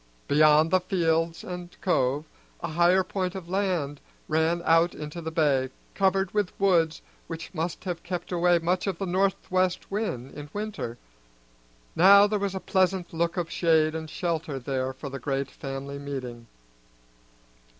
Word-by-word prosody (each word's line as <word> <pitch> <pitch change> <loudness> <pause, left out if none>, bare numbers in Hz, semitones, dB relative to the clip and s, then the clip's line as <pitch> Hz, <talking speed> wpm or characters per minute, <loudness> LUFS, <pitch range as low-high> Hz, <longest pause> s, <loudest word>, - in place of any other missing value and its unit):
Beyond 155 +2 +5
the 185 - +5
fields 165 -2 0
and 180 -1 -8
cove 140 -4 +1 0.4
a 170 - -3
higher 175 +4 +4
point 185 0 -3
of 185 -3 -7
land 175 -7 -1 0.3
ran 160 +2 +1
out 165 +1 +4
into 150 +3 -6
the 160 - -4
bay, 145 -5 +2 0.2
covered 190 -1 +1
with 205 -3 -1
woods 170 -5 +2 0.2
which 165 +2 -7
must 165 0 -3
have 180 -3 -4
kept 180 0 -5
away 175 0 +3
much 180 +3 0
of 190 -3 -1
the 195 - -3
northwest 185 0 0
wind 140 - -3
in 145 0 -8
winter. 205 - -4 1.0
Now 200 +3 +8
there 210 0 0
was 195 -1 -2
a - - -2
pleasant 185 -2 0
look 170 +1 -1
of 170 -2 -2
shade 160 -2 +3
and 160 -1 -5
shelter 165 -4 -2
there 130 0 -2
for 130 +2 -8
the 135 0 -6
great 135 +2 -2
family 140 +1 -6
meeting. 125 -5 -6
170 Hz, 155 wpm, -27 LUFS, 150-185 Hz, 1.0 s, Now